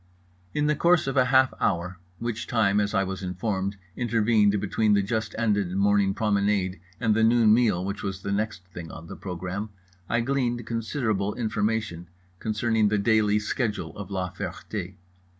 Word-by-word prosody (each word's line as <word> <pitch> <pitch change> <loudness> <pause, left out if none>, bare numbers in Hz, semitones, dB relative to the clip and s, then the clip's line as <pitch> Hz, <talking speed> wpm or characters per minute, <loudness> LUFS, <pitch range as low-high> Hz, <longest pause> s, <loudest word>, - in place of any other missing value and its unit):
In 150 - +1
the 150 0 +2
course 170 +3 +3
of 135 0 -2
a 130 -2 +5
half 130 0 +4
hour, 90 0 -1 0.2
which 115 -1 -4
time, 105 -3 +2
as 105 0 0
I 95 - +3
was 95 0 -4
informed, 95 +1 -2 0.2
intervened 110 -3 +2
between 105 +2 +1
the 100 - +2
just 110 +2 -2
ended 105 -5 +1
morning 100 -1 +3
promenade 100 -3 +1 0.2
and 115 -3 +2
the 110 - +3
noon 115 -1 +5
meal 105 -6 +2
which 100 +1 -4
was 95 -1 -4
the 100 - -2
next 105 -2 -2
thing 85 -2 -8
on 85 - -9
the - - -8
program, 90 +3 -5 0.4
I 120 - +2
gleaned 120 -2 -1
considerable 110 -3 -1
information 105 -5 -1 0.3
concerning 110 0 +1
the 105 +1 +1
daily 105 0 +3
schedule 105 - -2
of 100 -2 -7
La 95 -2 -2
Ferté. - - -6
105 Hz, 170 wpm, -26 LUFS, 95-115 Hz, 0.4 s, a